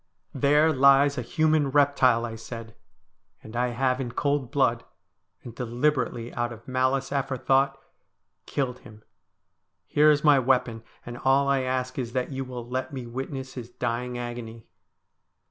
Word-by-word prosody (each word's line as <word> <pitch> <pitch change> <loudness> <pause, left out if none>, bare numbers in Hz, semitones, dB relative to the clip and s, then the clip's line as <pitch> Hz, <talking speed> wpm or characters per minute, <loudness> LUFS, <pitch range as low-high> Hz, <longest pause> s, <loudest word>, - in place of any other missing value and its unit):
' - - -45
There 150 +2 +4
lies 140 0 +5
a - - -1
human 155 +3 +1
reptile,' 135 -4 +3
I 115 -1 -6
said; 115 0 -9 0.3
' - - -43
and 110 +2 -11
I 125 +1 +1
have 130 +2 0
in 120 -2 -5
cold 140 -1 0
blood, 125 -5 +1 0.6
and 120 - -9
deliberately 120 0 -1
out 120 0 -2
of 115 -1 -12
malice 130 +1 0
aforethought, 135 0 +1 0.7
killed 125 -3 -2
him. 110 -3 -15 0.8
Here 150 +1 +4
is 150 -1 +3
my 145 -3 +6
weapon, 125 -3 +1 0.2
and 120 0 -7
all 135 +1 +3
I 140 -1 +2
ask 130 0 -2
is 120 -2 -4
that 130 +2 -2
you 135 0 -3
will 125 -2 -7
let 130 +4 -3
me 130 -3 -6
wit 130 +4 -5
ness 130 -1 -6
his 120 -2 -8
dying 120 +1 -3
agony.' 120 -2 -7
130 Hz, 165 wpm, -26 LUFS, 120-140 Hz, 0.8 s, my